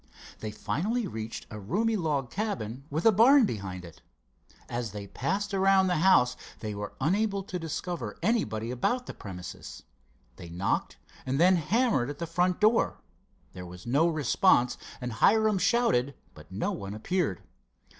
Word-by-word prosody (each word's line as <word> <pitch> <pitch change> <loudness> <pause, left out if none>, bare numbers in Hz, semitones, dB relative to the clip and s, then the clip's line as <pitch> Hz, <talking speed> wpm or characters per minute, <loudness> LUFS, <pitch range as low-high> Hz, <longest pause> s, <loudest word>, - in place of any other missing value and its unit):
They 110 - -4
finally 215 - -2
reached 110 - -6
a 105 - -6
roomy 210 - 0
log 145 - -1
cabin 140 - -4
with 155 +4 -2
a 225 - +8
barn 240 +6 +6
behind 95 - -5
it. 85 - -14 0.7
As 120 -3 -4
they 105 -1 -6
passed 200 - -2
around 195 0 +4
the 180 -2 +1
house 155 -8 +4 0.2
they 105 -1 -4
were 105 0 -6
unable 200 +6 +1
to 185 -1 -5
discover 165 - -4
anybody 125 - 0
about 245 - -1
the - - -7
premises. 90 -3 -9 0.5
They 85 - -10
knocked 90 +3 -2 0.3
and 130 +2 -1
then 185 +2 +6
hammered 180 - +1
at 145 - -6
the 170 - -3
front 175 +2 0
door. 215 +2 +2 0.5
There 90 - -8
was 90 +1 -11
no 140 +8 +3
response, 130 -5 +3 0.2
and 125 -2 -4
Hiram 215 - +3
shouted, 160 - +2 0.2
but 75 +3 -15
no 95 - -1
one 100 +1 -6
appeared. 150 - -1
155 Hz, 155 wpm, -28 LUFS, -, 0.7 s, a